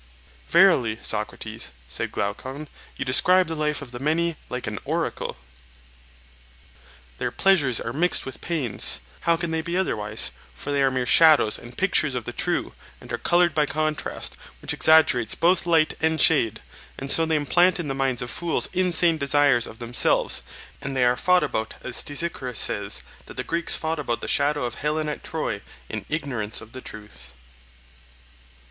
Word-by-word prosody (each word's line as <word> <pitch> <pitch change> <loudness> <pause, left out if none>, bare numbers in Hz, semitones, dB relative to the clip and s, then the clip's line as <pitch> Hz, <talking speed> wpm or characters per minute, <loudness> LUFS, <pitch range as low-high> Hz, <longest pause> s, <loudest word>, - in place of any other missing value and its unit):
Verily, 150 - +4
Socrates, 110 - -3 0.2
said 70 - -3
Glaucon, 130 +9 -4 0.3
you 140 - -3
describe 180 +8 +4
the 165 - -5
life 150 -2 -2
of 125 - -11
the 120 - -8
many 160 +4 0
like 125 0 -4
an 105 -1 -5
oracle. - - -3 1.8
Their - - -1
pleasures 145 -12 +2
are 115 - -5
mixed 175 +5 +2
with 130 - -8
pains—how 165 - 0
can 170 -1 -3
they 160 0 -1
be 170 +2 -3
otherwise? 110 - 0 0.2
For 145 - -6
they 140 -1 +1
are 135 - +4
mere 130 -1 -2
shadows 155 -6 +5
and 120 +1 -13
pictures 155 -7 +1
of 120 -3 -4
the - - -5
true, - - -2 0.3
and - - -10
are - - -2
coloured 175 -1 +2
by 150 -2 +1
contrast, 155 0 -2 0.2
which - - -3
exaggerates 155 -8 +4
both 175 +1 +2
light 160 -2 +3
and 160 0 +1
shade, 115 -9 +3 0.3
and 135 0 -1
so 165 0 +5
they 160 - +1
implant 175 +5 +3
in 165 - -3
the 135 - -2
minds 135 -3 0
of 120 - -6
fools 170 -2 0
insane 175 -3 +4
desires 140 -4 +3
of 110 - -11
themselves; 120 +1 +2 0.4
and 135 -1 -4
they 125 - +3
are 120 0 +3
fought 180 +6 +3
about 110 -6 -3
as 130 - -4
Stesichorus 145 -6 -1
says 100 -11 +1 0.2
that - - -12
the - - -2
Greeks 170 0 +1
fought 160 0 -3
about 120 -5 -3
the - - -5
shadow 145 -1 +1
of 120 - -6
Helen 155 +1 -1
at 150 - -5
Troy 115 -10 -4 0.3
in 110 -3 -6
ignorance 125 -9 -3
of 110 - -13
the 130 - -9
truth. 105 - -9
145 Hz, 170 wpm, -24 LUFS, 120-165 Hz, 1.8 s, shadows